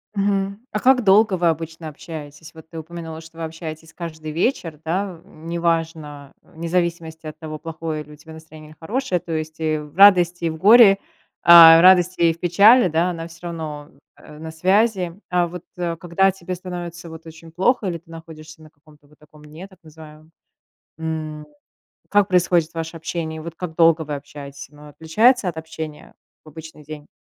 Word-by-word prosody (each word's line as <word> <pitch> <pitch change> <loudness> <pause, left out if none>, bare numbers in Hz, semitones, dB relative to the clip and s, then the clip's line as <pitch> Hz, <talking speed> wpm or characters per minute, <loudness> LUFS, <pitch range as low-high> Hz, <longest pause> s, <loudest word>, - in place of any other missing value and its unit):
Мгм. 200 0 -1
А 210 - -2
как 255 0 +3
долго 200 0 +4
вы 170 0 +1
обычно 160 0 -5
общаетесь? 155 0 -10
Вот 160 0 -14
ты 165 - -8
упомянула, 160 0 -9
что 165 0 -16
вы 165 - -6
общаетесь 160 0 -8
каждый 160 -3 -8
вечер, 165 - -2
да, 180 +1 -3
неважно, 165 -3 -4
вне 165 +1 -9
зависимости 165 -2 -3
от 155 - -9
того, 155 -2 -8
плохое 160 -1 -6
ли 150 +1 -15
у - - -12
тебя 160 +2 -15
настроение 155 -1 -14
или 155 - -18
хорошее. 205 +1 -2
То 165 0 -7
есть, 155 0 -5
и 155 -1 -1
в 150 +1 -10
радости 180 -3 +5
и - - +1
в 160 - -6
горе, 205 +1 +7 0.5
а, 165 -1 +9
радости 180 -1 +4
и 165 -1 +4
в 170 - -19
печали, 200 +6 +5
да, 170 +2 0
она 165 -1 -7
всё 170 +1 -11
равно, 155 -3 -7 0.3
э, 150 0 -15
на 160 0 -8
связи. 185 +1 +1
А 175 -1 +1
вот, 175 0 -9
э, 170 -1 -3
когда 180 +3 +1
тебе 185 -1 -7
становится 175 -1 -8
вот 160 0 -12
очень 160 0 -13
плохо 210 +6 0
или 170 -2 -3
ты 165 - -29
находишься 160 -1 -12
на 155 - -15
каком-то 150 -1 -24
вот 150 - -25
таком 150 0 -19
дне, 160 +6 -11
так 190 -2 -22
называемом, 155 0 -15 0.7
м, 155 -2 -5 0.6
как 205 -1 +2
происходит 175 -2 +1
ваше 165 0 -5
общение? 160 -1 -5
Вот 170 0 -8
как 175 -3 -6
долго 165 -1 +4
вы 150 -1 -5
общаетесь? 140 -1 -10
Оно 150 0 -15
отличается 205 - +2
от 165 - -5
общения 160 -1 -9 0.3
в - - -15
обычный 160 0 -12
день? 150 0 -10
165 Hz, 185 wpm, -21 LUFS, 155-180 Hz, 0.7 s, а